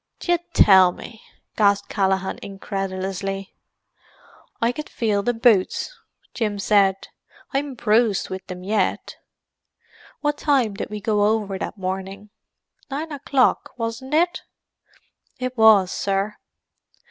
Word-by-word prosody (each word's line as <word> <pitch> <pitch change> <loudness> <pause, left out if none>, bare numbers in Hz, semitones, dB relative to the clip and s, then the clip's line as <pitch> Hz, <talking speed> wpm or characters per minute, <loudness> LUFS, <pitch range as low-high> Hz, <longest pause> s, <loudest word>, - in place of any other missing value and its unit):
"D'ye 350 -1 +1
tell 190 -3 +7
me!" 220 +4 -11 0.3
gasped 200 -2 +2
Callaghan 190 -1 0
incredulously. 195 0 -4 1.1
"I 230 +1 +2
could 300 +5 -7
feel 210 -3 0
the 245 - +1
boots," 230 - +2 0.4
Jim 210 -4 -2
said. 195 -1 +2 0.4
"I'm 275 0 -2
bruised 225 -3 +2
with 190 -1 -6
them 180 -1 -8
yet. 200 -1 -1 1.0
What 295 0 -1
time 265 -8 +2
did 195 - -5
we 210 0 -6
go 210 -1 +2
over 210 -3 -1
that 215 - -5
morning?—nine 200 - -7
o'clock, 275 -2 +1
wasn't 240 +5 -3
it?" 345 +2 +2 1.0
"It 255 0 -4
was, 215 -5 +6
sir." 200 +1 -1
210 Hz, 110 wpm, -22 LUFS, 195-245 Hz, 1.1 s, tell